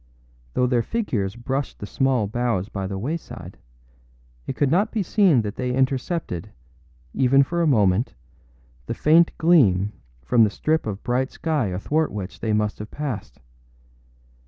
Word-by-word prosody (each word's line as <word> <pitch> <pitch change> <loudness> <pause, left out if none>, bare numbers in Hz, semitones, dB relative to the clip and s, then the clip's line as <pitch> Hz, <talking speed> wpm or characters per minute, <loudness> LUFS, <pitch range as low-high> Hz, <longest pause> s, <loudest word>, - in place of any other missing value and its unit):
Though 125 - +3
their 125 -1 +2
figures 115 - -2
brushed 130 +4 -3
the - - -6
small 130 0 +1
boughs 110 -2 -1
by 95 -1 -4
the 95 0 -4
wayside, 150 +11 -6 0.9
it - - -3
could 140 0 +1
not 195 +5 +2
be 215 -3 -1
seen 180 - +3
that 105 -1 -5
they 125 -1 -1
intercepted, 130 - -1 0.6
even 135 +2 +4
for 170 +5 -2
a 165 - +2
moment, 105 -4 +2 0.7
the - - -3
faint 165 +3 +5
gleam 105 - +4 0.3
from 120 -2 +4
the 105 - +4
strip 155 +6 -1
of 100 -1 -5
bright 130 +2 0
sky 155 -8 -1
athwart 145 - -1
which 100 -2 -6
they 110 - -2
must 105 0 0
have 105 +1 -7
passed. 135 -9 -5
125 Hz, 155 wpm, -23 LUFS, 105-150 Hz, 0.9 s, faint